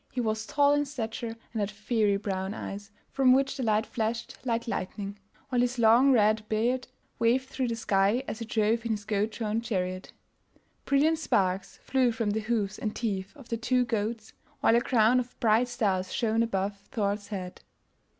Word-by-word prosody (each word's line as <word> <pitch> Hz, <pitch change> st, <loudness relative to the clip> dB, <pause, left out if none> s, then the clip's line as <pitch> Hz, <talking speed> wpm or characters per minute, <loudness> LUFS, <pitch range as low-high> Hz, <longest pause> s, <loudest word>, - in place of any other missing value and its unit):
He 255 Hz, -, -4 dB
was 220 Hz, -2 st, -1 dB
tall 285 Hz, 0 st, +4 dB
in 290 Hz, 0 st, +2 dB
stature 230 Hz, -4 st, -4 dB, 0.2 s
and 225 Hz, -, -2 dB
had 205 Hz, -1 st, 0 dB
fiery 210 Hz, -1 st, +1 dB
brown 195 Hz, 0 st, -3 dB
eyes, 200 Hz, -1 st, -6 dB, 0.2 s
from 260 Hz, -2 st, +5 dB
which 270 Hz, +1 st, +2 dB
the 270 Hz, -, -4 dB
light 220 Hz, -2 st, +2 dB
flashed 230 Hz, +1 st, -3 dB
like 235 Hz, -2 st, -1 dB
lightning, 200 Hz, -2 st, -4 dB, 0.3 s
while 245 Hz, -2 st, +2 dB
his 245 Hz, +1 st, 0 dB
long 235 Hz, +4 st, +6 dB
red 215 Hz, -3 st, +3 dB
beard 240 Hz, +4 st, 0 dB, 0.3 s
waved 250 Hz, +3 st, +2 dB
through 260 Hz, -2 st, -2 dB
the 230 Hz, -, -1 dB
sky 205 Hz, +2 st, +2 dB
as 220 Hz, -, -5 dB
he 230 Hz, -, -4 dB
drove 220 Hz, +1 st, +1 dB
in 230 Hz, -1 st, 0 dB
his 205 Hz, -1 st, -5 dB
goat 210 Hz, 0 st, 0 dB
drawn 220 Hz, 0 st, -2 dB
chariot. 185 Hz, -5 st, -3 dB, 0.7 s
Brilliant 310 Hz, +3 st, +3 dB
sparks 190 Hz, -, 0 dB
flew 260 Hz, -2 st, +2 dB
from 225 Hz, -2 st, -1 dB
the 215 Hz, -, 0 dB
hoofs 215 Hz, -2 st, -1 dB
and 215 Hz, -1 st, -3 dB
teeth 200 Hz, +1 st, -3 dB
of 270 Hz, -5 st, -14 dB
the 230 Hz, -, -1 dB
two 250 Hz, +2 st, +1 dB
goats, 220 Hz, -1 st, -3 dB, 0.3 s
while 225 Hz, -, +4 dB
a 235 Hz, -, +4 dB
crown 240 Hz, 0 st, +4 dB
of 250 Hz, 0 st, -6 dB
bright 230 Hz, +2 st, +3 dB
stars 195 Hz, -6 st, -1 dB
shone 225 Hz, -1 st, +1 dB
above 200 Hz, -3 st, -1 dB
Thor's 205 Hz, -1 st, -1 dB
head. 185 Hz, -4 st, -6 dB
225 Hz, 185 wpm, -28 LUFS, 205-245 Hz, 0.7 s, long